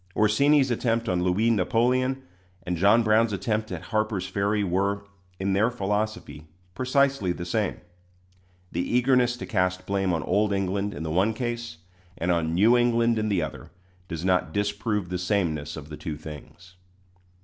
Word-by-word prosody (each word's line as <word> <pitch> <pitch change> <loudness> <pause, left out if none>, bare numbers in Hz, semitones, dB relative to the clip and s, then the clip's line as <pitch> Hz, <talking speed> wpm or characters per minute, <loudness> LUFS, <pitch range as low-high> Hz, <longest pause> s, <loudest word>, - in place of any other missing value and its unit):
Orsini's 135 +6 +3
attempt 115 0 0
on 90 -3 0
Louis 95 +6 +2
Napoleon 125 +6 +1 0.4
and 90 - -1
John 100 +7 +4
Brown's 110 0 +3
attempt 110 +1 -2
at 90 -3 -5
Harper's 110 -3 0
Ferry 100 +2 0
were, 100 +2 0 0.4
in 95 0 0
their 105 +4 +3
philosophy, 105 -7 -3 0.3
precisely 130 -4 +1
the 85 0 -5
same. 105 +2 -1 0.9
The 85 - -1
eagerness 125 +2 +2
to - - -6
cast 90 -2 -1
blame 95 -1 0
on 80 -3 -1
old 100 +2 +1
England 100 +1 -1
in 75 - -5
the 80 - -3
one 100 +7 +2
case 120 -6 -4 0.4
and 90 +2 0
on 85 -1 0
New 110 +7 +5
England 120 -1 +2
in 110 0 -1
the 95 -5 +1
other, - - -7 0.4
does 85 -1 -5
not 90 -4 +1
disprove 105 0 -1
the 90 -1 -2
sameness 85 -7 -1
of 75 -1 -9
the 75 - -7
two 75 -2 -5
things. 80 +4 -11
100 Hz, 160 wpm, -26 LUFS, 90-115 Hz, 0.9 s, New